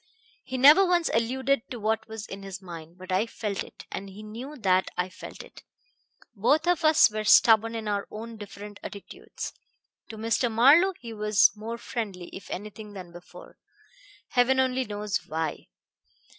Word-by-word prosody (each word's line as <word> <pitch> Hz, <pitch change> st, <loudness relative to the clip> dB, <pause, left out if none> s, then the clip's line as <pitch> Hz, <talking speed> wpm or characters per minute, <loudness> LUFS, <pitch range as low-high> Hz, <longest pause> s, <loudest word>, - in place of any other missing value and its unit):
He 260 Hz, -, -5 dB
never 295 Hz, +9 st, +8 dB
once 355 Hz, -3 st, +2 dB
alluded 260 Hz, +3 st, 0 dB
to 245 Hz, -, -6 dB
what 220 Hz, +1 st, -1 dB
was 220 Hz, -1 st, -7 dB
in 195 Hz, -1 st, -8 dB
his 195 Hz, -1 st, -7 dB
mind; 170 Hz, -2 st, -10 dB
but 185 Hz, +1 st, -9 dB
I 190 Hz, +5 st, +1 dB
felt 210 Hz, -3 st, -4 dB
it, -, -, -14 dB
and 195 Hz, -, -6 dB
he 200 Hz, +3 st, -11 dB
knew 240 Hz, +8 st, -8 dB
that 185 Hz, -5 st, +2 dB
I 180 Hz, +1 st, -1 dB
felt -, -, -10 dB
it. -, -, -15 dB, 0.7 s
Both 285 Hz, -, +2 dB
of 355 Hz, -2 st, +2 dB
us 310 Hz, -7 st, +6 dB
were 215 Hz, 0 st, -3 dB
stubborn 225 Hz, +1 st, +5 dB
in 220 Hz, -1 st, -4 dB
our 205 Hz, -1 st, -1 dB, 0.3 s
different 205 Hz, -1 st, -10 dB
attitudes. 200 Hz, -2 st, -8 dB, 0.6 s
To 220 Hz, -, -8 dB
Mr. 230 Hz, +2 st, 0 dB
Marlowe 295 Hz, +12 st, +5 dB
he 230 Hz, -2 st, -8 dB
was 210 Hz, -1 st, +4 dB
more 225 Hz, +2 st, -6 dB
friendly, 210 Hz, -8 st, -5 dB
if 190 Hz, -, -10 dB
anything, 210 Hz, +2 st, -7 dB
than 185 Hz, -3 st, -9 dB
before 175 Hz, +1 st, -14 dB, 0.7 s
heaven 255 Hz, +1 st, +3 dB
only 260 Hz, 0 st, +1 dB
knows 210 Hz, -1 st, -2 dB
why. 160 Hz, -1 st, -3 dB
215 Hz, 165 wpm, -27 LUFS, 200-245 Hz, 0.7 s, never